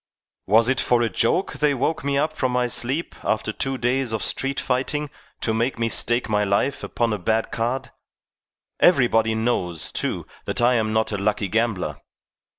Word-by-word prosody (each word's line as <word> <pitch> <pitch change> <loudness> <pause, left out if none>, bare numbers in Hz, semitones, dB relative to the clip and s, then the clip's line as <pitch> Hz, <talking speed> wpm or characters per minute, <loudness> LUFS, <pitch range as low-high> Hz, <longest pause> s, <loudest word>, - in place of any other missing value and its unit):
"Was 110 +3 +5
it 130 +1 +2
for 120 -1 +2
a 115 - +1
joke 150 +11 +1
they 150 -2 +1
woke 135 +4 -1
me 140 0 0
up 155 +2 +1
from 130 -4 -1
my 125 0 +2
sleep 125 +7 0
after 110 0 0
two 135 +3 -1
days 125 0 0
of 110 -2 -2
street 135 0 -1
fighting 135 +3 -1 0.3
to 110 - 0
make 115 +4 0
me 115 0 0
stake 120 +2 +1
my 105 -2 +1
life 105 +8 0
upon 115 -2 -1
a 105 - -3
bad 110 +5 0
card? 125 +3 -2 0.9
Everybody 115 -9 +4
knows, 90 - -1
too, - - -2 0.2
that - - -2
I 120 +1 +4
am 110 -2 +1
not 110 0 +1
a 100 - -2
lucky 100 0 0
gambler." 105 -9 -1
120 Hz, 180 wpm, -23 LUFS, 110-130 Hz, 0.9 s, Was